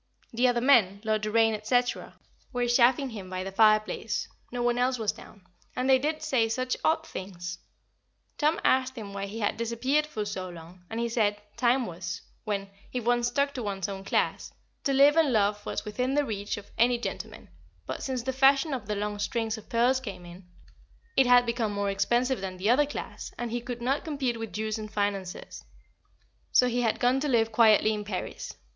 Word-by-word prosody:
The 245 Hz, +2 st, +3 dB
other 240 Hz, -1 st, +1 dB
men, 225 Hz, -7 st, +4 dB
Lord 215 Hz, -1 st, 0 dB
Doraine, 220 Hz, 0 st, +2 dB
&c., 245 Hz, +3 st, +3 dB, 0.7 s
were 245 Hz, -1 st, 0 dB
chaffing 250 Hz, +2 st, +3 dB
him 200 Hz, -4 st, -8 dB
by 185 Hz, 0 st, -3 dB
the 195 Hz, -, -5 dB
fireplace 215 Hz, +1 st, +2 dB, 0.2 s
no 245 Hz, -1 st, -2 dB
one 240 Hz, 0 st, +1 dB
else 250 Hz, +1 st, +2 dB
was 220 Hz, -3 st, 0 dB
down 200 Hz, -4 st, -15 dB, 0.3 s
and 255 Hz, +1 st, -1 dB
they 265 Hz, -1 st, +6 dB
did 305 Hz, +3 st, -2 dB
say 230 Hz, -4 st, +2 dB
such 255 Hz, +2 st, -1 dB
odd 320 Hz, 0 st, +2 dB
things. 180 Hz, -, -7 dB, 0.8 s
Tom 305 Hz, +2 st, +2 dB
asked 260 Hz, 0 st, +2 dB
him 205 Hz, -4 st, -7 dB
why 200 Hz, 0 st, -4 dB
he 220 Hz, +3 st, -6 dB
had 205 Hz, -, 0 dB
disappeared 255 Hz, +6 st, 0 dB
for 215 Hz, -8 st, -4 dB
so 190 Hz, -3 st, -4 dB
long, 175 Hz, +1 st, -12 dB
and 225 Hz, -, -4 dB
he 235 Hz, -, 0 dB
said, 210 Hz, -3 st, +1 dB, 0.2 s
Time 245 Hz, +2 st, +2 dB
was, 180 Hz, -1 st, -6 dB, 0.2 s
when 200 Hz, -2 st, -3 dB, 0.2 s
if 250 Hz, -2 st, -3 dB
one 240 Hz, 0 st, +3 dB
stuck 280 Hz, +4 st, 0 dB
to 255 Hz, -, -4 dB
one's 195 Hz, -4 st, -3 dB
own 195 Hz, -1 st, -6 dB
class -, -, -1 dB, 0.3 s
to 275 Hz, -, +2 dB
live 280 Hz, +2 st, +6 dB
and 320 Hz, -4 st, +4 dB
love 205 Hz, -2 st, +1 dB
was -, -, -3 dB
within 250 Hz, +6 st, -1 dB
the 290 Hz, 0 st, +2 dB
reach 205 Hz, -3 st, -3 dB
of 205 Hz, -, -11 dB
any 240 Hz, +1 st, +4 dB
gentleman, 235 Hz, -, -6 dB, 0.4 s
but -, -, -5 dB
since 255 Hz, -3 st, -3 dB
the 265 Hz, +1 st, -2 dB
fashion 270 Hz, +3 st, +4 dB
of 240 Hz, -6 st, -4 dB
the 210 Hz, -, -1 dB
long 205 Hz, 0 st, -3 dB
strings 225 Hz, +1 st, -1 dB
of 220 Hz, -, -12 dB
pearls 245 Hz, +3 st, +3 dB
came 200 Hz, -8 st, -8 dB
in, 175 Hz, +1 st, -12 dB, 0.7 s
it 265 Hz, -, +5 dB
had 245 Hz, 0 st, +6 dB
become 235 Hz, -2 st, -1 dB
more 200 Hz, -1 st, -1 dB
expensive 240 Hz, +4 st, +1 dB
than 185 Hz, -1 st, -5 dB
the 200 Hz, +5 st, +2 dB
other 285 Hz, +4 st, +4 dB
class, 290 Hz, -, -7 dB
and 240 Hz, -1 st, -4 dB
he 240 Hz, +1 st, -2 dB
could 240 Hz, 0 st, -6 dB
not 270 Hz, +3 st, 0 dB
compete 270 Hz, -7 st, -2 dB
with 225 Hz, -2 st, -5 dB
Jews 215 Hz, 0 st, -3 dB
and 215 Hz, -1 st, -7 dB
financiers, 200 Hz, -3 st, -3 dB, 0.9 s
so 250 Hz, -, +5 dB
he 245 Hz, 0 st, 0 dB
had 225 Hz, -2 st, 0 dB
gone 250 Hz, +2 st, +3 dB
to 295 Hz, -, -1 dB
live 225 Hz, -4 st, +2 dB
quietly 220 Hz, -1 st, +5 dB
in 210 Hz, -1 st, -3 dB
Paris. 195 Hz, -3 st, -5 dB
230 Hz, 200 wpm, -28 LUFS, 205-255 Hz, 0.9 s, they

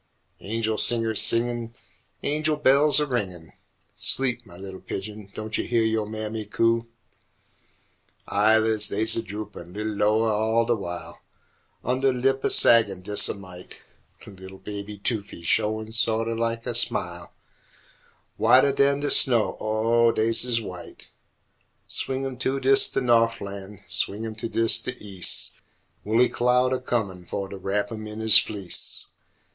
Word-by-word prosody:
Angel 110 Hz, +1 st, -2 dB
singers 115 Hz, -3 st, +2 dB
singin', 120 Hz, 0 st, 0 dB, 0.5 s
Angel 155 Hz, +1 st, 0 dB
bells 145 Hz, 0 st, +4 dB
a 150 Hz, -, +1 dB
ringin', 95 Hz, -, -4 dB, 0.4 s
Sleep, 125 Hz, -3 st, -1 dB
mah 85 Hz, -, -12 dB
li'l 95 Hz, 0 st, -9 dB
pigeon, 105 Hz, 0 st, -7 dB
don' 110 Hz, 0 st, -6 dB
yo' -, -, 0 dB
heah 120 Hz, -2 st, 0 dB
yo' 110 Hz, -1 st, -1 dB
mammy 110 Hz, 0 st, -5 dB
coo? 115 Hz, +2 st, +1 dB, 1.4 s
Eyelids 110 Hz, +1 st, +3 dB
des 110 Hz, +2 st, +2 dB
a 115 Hz, -, -1 dB
droopin' 105 Hz, -3 st, -9 dB
li'l 105 Hz, +1 st, -4 dB
loweh 105 Hz, +2 st, +2 dB
all 110 Hz, +2 st, +1 dB
de 120 Hz, -, +1 dB
w'ile, 90 Hz, -5 st, -6 dB, 0.7 s
Undeh 130 Hz, +1 st, 0 dB
lip 135 Hz, +1 st, 0 dB
a -, -, +1 dB
saggin' 100 Hz, -6 st, +4 dB
des 105 Hz, +2 st, +2 dB
a -, -, -3 dB
mite; 95 Hz, -2 st, -12 dB, 0.4 s
Li'l 95 Hz, -1 st, -12 dB
baby 105 Hz, +1 st, -8 dB
toofies 100 Hz, -4 st, -3 dB
showin' 110 Hz, +4 st, 0 dB
so't 115 Hz, 0 st, +1 dB
o' 115 Hz, -, -2 dB
lak 115 Hz, 0 st, -2 dB
a 120 Hz, -, -3 dB
smile, 100 Hz, -7 st, +1 dB, 1.1 s
Whiteh 130 Hz, +4 st, +5 dB
dan 140 Hz, 0 st, +2 dB
de 145 Hz, -, -1 dB
snow, 120 Hz, -5 st, +5 dB
or 115 Hz, +2 st, +2 dB
des 115 Hz, +1 st, +2 dB
ez 120 Hz, -2 st, +3 dB
white. 90 Hz, -5 st, -10 dB, 0.8 s
Swing 135 Hz, 0 st, 0 dB
'im 130 Hz, -2 st, -5 dB
to'ds 135 Hz, 0 st, +2 dB
de 135 Hz, -, -2 dB
No'flan', 105 Hz, -5 st, -1 dB
Swing 105 Hz, +3 st, 0 dB
'im 110 Hz, -, -5 dB
to'ds 115 Hz, +1 st, +1 dB
de 125 Hz, -, -5 dB
Eas' 95 Hz, -4 st, -3 dB, 0.4 s
Woolly 115 Hz, +4 st, +3 dB
cloud 125 Hz, +1 st, +1 dB
a 130 Hz, -, -1 dB
comin' 105 Hz, -8 st, -3 dB
fo' 100 Hz, -1 st, -4 dB
t' 100 Hz, -, -9 dB
wrap 100 Hz, +4 st, -2 dB
'im 110 Hz, -1 st, -7 dB
in 105 Hz, +1 st, -8 dB
'is 110 Hz, -2 st, +8 dB
fleece! 100 Hz, -5 st, -6 dB
110 Hz, 145 wpm, -24 LUFS, 105-120 Hz, 1.4 s, is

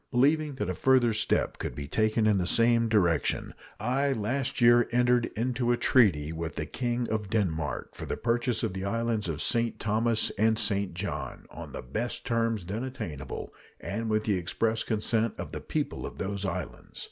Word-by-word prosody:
Believing 145 Hz, +3 st, +2 dB
that -, -, -2 dB
a -, -, -1 dB
further 130 Hz, -3 st, +3 dB
step 105 Hz, -, 0 dB
could -, -, -4 dB
be 70 Hz, -1 st, -5 dB
taken 110 Hz, +5 st, +1 dB
in 105 Hz, -2 st, +4 dB
the 90 Hz, -, -1 dB
same 115 Hz, +1 st, +4 dB
direction, 90 Hz, -8 st, +1 dB, 0.3 s
I 135 Hz, +5 st, +1 dB
last 125 Hz, +5 st, -1 dB
year 120 Hz, 0 st, +6 dB
entered 120 Hz, 0 st, +3 dB
into 120 Hz, +1 st, 0 dB
a 120 Hz, -, +2 dB
treaty 85 Hz, -, +3 dB
with 80 Hz, 0 st, -4 dB
the -, -, -3 dB
King 120 Hz, -1 st, -2 dB
of 105 Hz, -2 st, -2 dB
Denmark 80 Hz, -9 st, -1 dB
for -, -, -7 dB
the -, -, -2 dB
purchase 120 Hz, 0 st, 0 dB
of 110 Hz, -5 st, -1 dB
the 95 Hz, 0 st, -4 dB
islands 115 Hz, -1 st, -1 dB
of 75 Hz, -2 st, -2 dB
St. 115 Hz, -1 st, +1 dB
Thomas 110 Hz, +1 st, +1 dB
and 110 Hz, +1 st, +3 dB
St. 100 Hz, -5 st, 0 dB
John, 100 Hz, +3 st, -4 dB
on -, -, -9 dB
the -, -, -6 dB
best 120 Hz, -, -3 dB
terms 115 Hz, -4 st, 0 dB
then 105 Hz, +7 st, -3 dB
attainable, 85 Hz, -, -6 dB, 0.3 s
and 115 Hz, +3 st, -3 dB
with 110 Hz, 0 st, +1 dB
the 105 Hz, -3 st, +1 dB
express 110 Hz, +6 st, 0 dB
consent 110 Hz, +1 st, 0 dB
of -, -, -6 dB
the -, -, -5 dB
people -, -, -3 dB
of -, -, -10 dB
those 100 Hz, +1 st, -3 dB
islands. -, -, -6 dB
110 Hz, 185 wpm, -28 LUFS, 100-120 Hz, 0.3 s, year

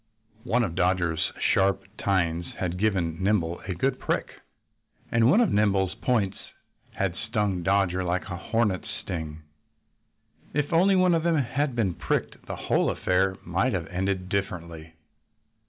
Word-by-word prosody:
One 120 Hz, 0 st, +2 dB
of 85 Hz, -, -2 dB
Dodger's 85 Hz, -2 st, +1 dB, 0.2 s
sharp 95 Hz, -1 st, +2 dB, 0.2 s
tines 85 Hz, -3 st, 0 dB
had 90 Hz, -1 st, -2 dB
given 95 Hz, -5 st, 0 dB
Nimble 90 Hz, -4 st, +1 dB
a 95 Hz, -, -2 dB
good 130 Hz, +8 st, 0 dB
prick. -, -, -1 dB, 0.8 s
And 115 Hz, 0 st, +4 dB
one 215 Hz, -, +5 dB
of 230 Hz, -, +2 dB
Nimble's 100 Hz, -3 st, +2 dB
points 105 Hz, -6 st, 0 dB, 0.5 s
had 95 Hz, -2 st, -1 dB
stung 105 Hz, -5 st, -1 dB
Dodger 95 Hz, 0 st, +2 dB
like 90 Hz, +1 st, -1 dB
a 90 Hz, -, -4 dB
hornet's 100 Hz, +1 st, -1 dB
sting. 80 Hz, -2 st, -6 dB, 1.1 s
If 150 Hz, +2 st, 0 dB
only 190 Hz, +4 st, +5 dB
one 185 Hz, -1 st, +4 dB
of 165 Hz, -, +2 dB
them 165 Hz, -1 st, +2 dB
had 140 Hz, 0 st, 0 dB
been 105 Hz, -7 st, +1 dB
pricked -, -, -3 dB
the -, -, -4 dB
whole -, -, +1 dB
affair 95 Hz, +1 st, +1 dB
might 95 Hz, +9 st, +1 dB
have 90 Hz, -4 st, -1 dB
ended 95 Hz, 0 st, -1 dB
differently. 85 Hz, -4 st, -4 dB
95 Hz, 145 wpm, -26 LUFS, 90-115 Hz, 1.1 s, one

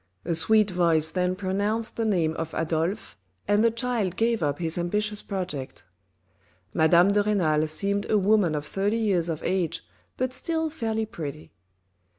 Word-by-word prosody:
A 170 Hz, -, 0 dB
sweet 210 Hz, +5 st, +3 dB
voice 165 Hz, -3 st, +2 dB
then 180 Hz, 0 st, 0 dB
pronounced 205 Hz, +4 st, -1 dB
the 225 Hz, -, -1 dB
name 170 Hz, -7 st, +1 dB
of 160 Hz, 0 st, -5 dB
Adolphe 165 Hz, -, -2 dB, 0.3 s
and 205 Hz, +1 st, +3 dB
the 230 Hz, -, +5 dB
child 230 Hz, -5 st, -1 dB
gave 230 Hz, 0 st, +1 dB
up 145 Hz, -2 st, 0 dB
his 165 Hz, -2 st, -2 dB
ambitious 210 Hz, +4 st, -1 dB
project. 175 Hz, -, -5 dB, 0.9 s
Madame 170 Hz, +4 st, +5 dB
de 205 Hz, +1 st, +3 dB
Renal 165 Hz, -7 st, +1 dB
seemed 200 Hz, +6 st, -1 dB
a 215 Hz, -, +4 dB
woman 200 Hz, -5 st, +3 dB
of 150 Hz, 0 st, -3 dB
thirty 200 Hz, +7 st, -1 dB
years 190 Hz, -7 st, +1 dB
of 160 Hz, -1 st, -4 dB
age 185 Hz, -4 st, -1 dB, 0.3 s
but 255 Hz, 0 st, -1 dB
still 320 Hz, +2 st, -1 dB
fairly 225 Hz, -6 st, -2 dB
pretty. 155 Hz, -7 st, -7 dB
190 Hz, 160 wpm, -26 LUFS, 165-215 Hz, 0.9 s, the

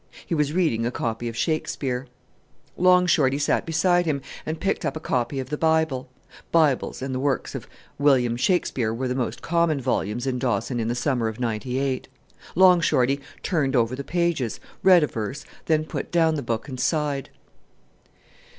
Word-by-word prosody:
He -, -, -3 dB
was 150 Hz, -2 st, +1 dB
reading 155 Hz, -10 st, +1 dB
a 120 Hz, -, +1 dB
copy 120 Hz, -1 st, -3 dB
of 115 Hz, -, -8 dB
Shakespeare. 135 Hz, -4 st, -1 dB, 0.7 s
Long 180 Hz, 0 st, +5 dB
Shorty 140 Hz, -6 st, +3 dB
sat 145 Hz, +2 st, 0 dB
beside 175 Hz, +2 st, +2 dB
him, 140 Hz, -3 st, -1 dB, 0.2 s
and 160 Hz, +1 st, -3 dB
picked 195 Hz, -, -1 dB
up -, -, -2 dB
a -, -, -5 dB
copy 125 Hz, -2 st, -1 dB
of 130 Hz, +1 st, -6 dB
the 150 Hz, -, -2 dB
Bible. 160 Hz, -5 st, +1 dB, 0.4 s
Bibles 150 Hz, -5 st, +2 dB
and 135 Hz, 0 st, -3 dB
the 130 Hz, -, -2 dB
works 140 Hz, 0 st, -1 dB
of -, -, -6 dB, 0.3 s
William 130 Hz, -5 st, +3 dB
Shakespeare 125 Hz, -, +1 dB
were 125 Hz, +3 st, -2 dB
the 125 Hz, -, -1 dB
most 125 Hz, -2 st, -3 dB
common 170 Hz, -3 st, +1 dB
volumes 120 Hz, -2 st, -1 dB
in 130 Hz, -2 st, -1 dB
Dawson 120 Hz, 0 st, -1 dB
in 115 Hz, -, -1 dB
the 120 Hz, -, -1 dB
summer 125 Hz, -2 st, 0 dB
of 110 Hz, +2 st, -5 dB
'98. 125 Hz, +3 st, -2 dB, 0.5 s
Long 180 Hz, -1 st, +6 dB
Shorty 135 Hz, -2 st, +2 dB, 0.2 s
turned 145 Hz, -7 st, 0 dB
over 120 Hz, 0 st, +2 dB
the 140 Hz, -, -5 dB
pages, 170 Hz, -8 st, -1 dB, 0.2 s
read 180 Hz, -4 st, +6 dB
a -, -, +2 dB
verse, 115 Hz, +4 st, -5 dB, 0.2 s
then 155 Hz, -1 st, +2 dB
put -, -, -5 dB
down 165 Hz, -2 st, +3 dB
the 150 Hz, -, -2 dB
book, 115 Hz, +1 st, -3 dB
and 130 Hz, -3 st, -7 dB
sighed. 145 Hz, 0 st, 0 dB
135 Hz, 180 wpm, -24 LUFS, 125-160 Hz, 0.7 s, Long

